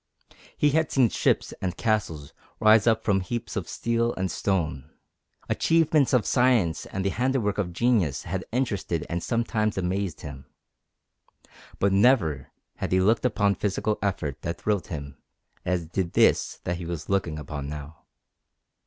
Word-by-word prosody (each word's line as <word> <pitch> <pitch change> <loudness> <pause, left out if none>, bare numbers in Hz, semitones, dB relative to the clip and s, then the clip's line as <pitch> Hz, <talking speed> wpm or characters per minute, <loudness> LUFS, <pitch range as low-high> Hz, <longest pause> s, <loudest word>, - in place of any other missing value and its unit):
He 150 - +3
had 160 +1 +1
seen 130 -4 +4
ships - - 0
and 90 -2 -2
castles 85 -10 -1 0.3
rise 110 0 +5
up 110 -1 +3
from 100 -2 +2
heaps 115 +5 -4
of 100 -6 -3
steel 115 0 0
and 95 0 -2
stone; 80 -8 -1 0.6
achievements 160 -4 +3
of 125 -4 +3
science 120 -10 +2
and 95 0 -4
the - - +3
handiwork 125 -5 0
of 90 -3 -1
genius 105 - +1
had 95 +2 -3
interested 105 - -1
and 85 +1 -1
sometimes 110 -1 -1
amazed 95 -1 -2
him, 70 -2 -9 1.3
but 100 0 +2
never 95 - +3 0.3
had - - -3
he 95 - +4
looked 110 +6 +2
upon 100 -4 +2
physical 105 +2 -1
effort 85 -8 -2
that 85 0 -4
thrilled 100 -5 -1
him 70 -6 -7 0.4
as 90 -2 0
did 85 +1 -3
this - - +3
that 90 0 -2
he 85 - -6
was 85 -2 -5
looking 90 -5 0
upon 75 -1 -6
now. 75 0 -9
95 Hz, 155 wpm, -26 LUFS, 85-115 Hz, 1.3 s, rise